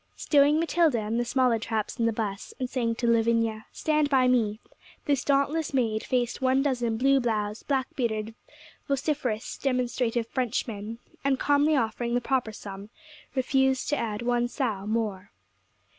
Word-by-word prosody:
Stowing 290 +1 +4
Matilda 330 -6 +2
and 220 +2 -2
the 240 - 0
smaller 250 -2 +2
traps 220 +2 -3
in 230 - +3
the - - +2
bus, 210 -2 -4
and 255 - -1
saying 235 -3 -1
to 240 - -3
Lavinia, 230 -1 +1
'Stand 305 -2 +1
by 260 -3 +4
me,' 220 -4 +2 0.5
this 285 -3 +1
dauntless 285 +2 +1
maid 220 -4 +1
faced 245 -1 -1
one 265 +1 +3
dozen 240 -5 0
blue 270 +3 +4
bloused, 215 -3 -2
black 270 -2 +1
bearded, 225 -5 -2 0.5
vociferous, 275 -5 -2
demonstrative 245 -3 0
Frenchmen; 230 -3 -3 0.3
and, 275 -1 +2
calmly 290 +2 +3
offering 235 -1 -1
the - - +3
proper 245 -2 0
sum, 200 -1 -9 0.5
refused 265 0 +1
to 295 - +2
add 225 -3 -3
one 240 0 +1
sou 225 -6 -2
more. 215 -3 -2
240 Hz, 155 wpm, -27 LUFS, 225-270 Hz, 0.5 s, Stowing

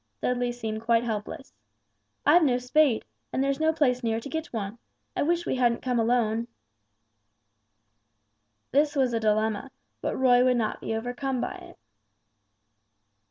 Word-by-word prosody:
Dudley 245 - 0
seemed 220 -2 -4
quite 230 0 +2
helpless. 220 +3 -5 0.7
"I've 350 - +6
no 255 -5 +3
spade, 250 -1 +2 0.3
and 265 - 0
there's 275 +1 0
no 315 0 +3
place 260 -6 +1
near 225 -1 0
to 255 - -8
get 320 +1 -3
one. 215 0 -4 0.4
I - - 0
wish 345 +3 +1
we - - -1
hadn't 240 -2 +1
come 250 -2 0
alone." 230 -1 +1 2.2
This 290 +2 +2
was 260 -3 +2
a 230 - +1
dilemma, 215 +3 0 0.3
but - - -2
Roy 250 -1 +5
would 250 -1 +3
not 220 -2 -2
be 225 - -2
overcome 245 +3 -3
by - - -2
it. - - -12
245 Hz, 150 wpm, -27 LUFS, 225-270 Hz, 2.2 s, I've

